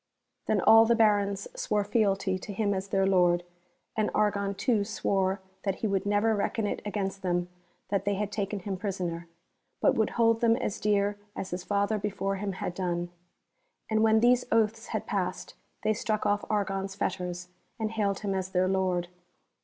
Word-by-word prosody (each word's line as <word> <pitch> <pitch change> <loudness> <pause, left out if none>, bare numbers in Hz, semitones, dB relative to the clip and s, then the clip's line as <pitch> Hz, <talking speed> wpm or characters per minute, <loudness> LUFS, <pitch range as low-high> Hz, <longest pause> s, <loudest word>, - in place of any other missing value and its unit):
Then - - +2
all 225 0 +8
the 235 +1 +3
Barons 205 -3 +2
swore 210 -1 0
fealty 195 -3 +1
to 205 - -7
him 205 0 0
as 190 0 -3
their 195 0 +1
Lord, 175 -2 +3 0.5
and 215 -1 +1
Argon 200 -1 +1
too 225 -2 +1
swore 195 -2 0 0.2
that 195 -2 -1
he 220 - -2
would 195 0 -1
never 205 +2 +3
reckon 210 +2 -1
it - - -2
against 195 -2 -3
them 175 -1 -1 0.4
that 195 -1 0
they 205 0 0
had 205 +1 -2
taken 200 -1 -3
him 190 0 -4
prisoner, 180 -4 -3 0.5
but - - +4
would 220 - +1
hold 230 -1 +3
them 230 -1 +4
as 205 - -3
dear 205 0 +1 0.2
as 190 - -5
his 180 0 -4
father 205 +2 0
before 195 -1 -2
him 200 0 -3
had 180 - -4
done. 175 -1 -2 0.8
And 220 0 +3
when 220 0 +4
these 245 +1 +4
oaths 225 0 +1
had - - -3
passed - - -3 0.3
they 215 0 +3
struck 215 0 -2
off 205 0 +1
Argon's 195 -2 -1
fetters, 180 -2 -3 0.3
and 220 -1 -1
hailed 205 -3 -1
him 200 -2 -1
as 190 -1 -2
their 185 0 +2
lord. 185 -2 0
200 Hz, 180 wpm, -28 LUFS, 190-215 Hz, 0.8 s, all